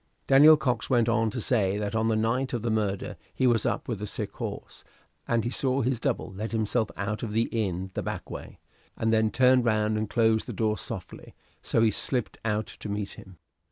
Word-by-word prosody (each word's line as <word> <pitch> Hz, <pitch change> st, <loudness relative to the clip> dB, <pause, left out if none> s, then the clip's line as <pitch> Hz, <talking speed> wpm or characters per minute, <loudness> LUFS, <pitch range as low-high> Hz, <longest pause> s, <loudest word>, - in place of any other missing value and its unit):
Daniel 150 Hz, +3 st, +8 dB
Cox 125 Hz, -6 st, -1 dB
went 120 Hz, -3 st, +3 dB
on 115 Hz, -1 st, +2 dB
to 115 Hz, -, -4 dB
say 100 Hz, -4 st, +1 dB
that 105 Hz, +1 st, -3 dB
on 110 Hz, 0 st, +1 dB
the 110 Hz, -, +2 dB
night 115 Hz, +5 st, 0 dB
of 120 Hz, -2 st, -2 dB
the 115 Hz, -, 0 dB
murder 105 Hz, -3 st, -1 dB, 0.2 s
he 130 Hz, -, +1 dB
was 120 Hz, -3 st, +3 dB
up -, -, -2 dB
with 110 Hz, -5 st, -3 dB
a 105 Hz, -, -3 dB
sick -, -, -4 dB
horse, -, -, -7 dB, 0.4 s
and 115 Hz, -1 st, +1 dB
he 120 Hz, -, -2 dB
saw 130 Hz, +1 st, +1 dB
his 125 Hz, 0 st, 0 dB
double -, -, -2 dB
let 105 Hz, +4 st, -5 dB
himself 110 Hz, 0 st, 0 dB
out 105 Hz, +1 st, -3 dB
of 110 Hz, -3 st, -4 dB
the 115 Hz, +1 st, +3 dB
inn 95 Hz, -4 st, -2 dB
the -, -, -2 dB
back -, -, -5 dB
way, -, -, -8 dB, 0.4 s
and 110 Hz, 0 st, +1 dB
then 110 Hz, 0 st, +3 dB
turn 125 Hz, +2 st, +4 dB
round 110 Hz, -2 st, +1 dB
and 110 Hz, -1 st, -3 dB
close 110 Hz, -1 st, +2 dB
the -, -, -6 dB
door 110 Hz, -1 st, 0 dB
softly; -, -, -7 dB, 0.3 s
so 115 Hz, -, +1 dB
he 110 Hz, -, +4 dB
slipped 125 Hz, +3 st, -2 dB
out 110 Hz, -1 st, 0 dB
to 105 Hz, -, -9 dB
meet 100 Hz, -1 st, -3 dB
him. 95 Hz, -2 st, -13 dB
110 Hz, 220 wpm, -27 LUFS, 105-120 Hz, 0.4 s, Daniel